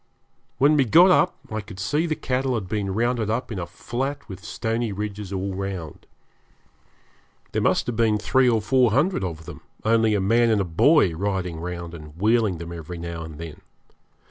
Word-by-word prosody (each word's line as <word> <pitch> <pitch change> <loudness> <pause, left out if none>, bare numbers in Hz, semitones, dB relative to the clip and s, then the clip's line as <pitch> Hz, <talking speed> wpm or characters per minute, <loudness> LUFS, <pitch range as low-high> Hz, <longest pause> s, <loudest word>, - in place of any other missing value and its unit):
When 145 +3 +4
we 135 - +4
got 175 - +7
up - - +3
I 110 0 -2
could 100 -2 -11
see 150 - 0
the 155 - -1
cattle 130 -1 -1
had 105 -5 -3
been 100 -1 -2
rounded 115 +1 0
up 115 +3 -2
in 100 - -4
a 85 - -4
flat 135 +10 -4
with 95 -2 -9
stony 115 -1 -2
ridges 105 0 -5
all 95 0 -3
round. 95 -5 -6 1.4
There - - -1
must - - +2
have 120 - -3
been 110 -2 +3
three 130 +3 +3
or 110 -3 +1
four 125 +3 +3
hundred 145 - +1
of 80 -3 -5
them, - - -10 0.2
only 110 -1 +3
a - - +1
man 115 +5 +3
and 110 -2 +3
a - - +2
boy 90 - +4
riding 90 -2 -2
round 85 0 -6
and 75 -1 -11
wheeling 110 -3 +2
them 85 +1 -7
every 85 +1 -7
now 85 0 -6
and 80 -2 -8
then. 80 -1 -9
105 Hz, 195 wpm, -24 LUFS, 90-120 Hz, 1.4 s, got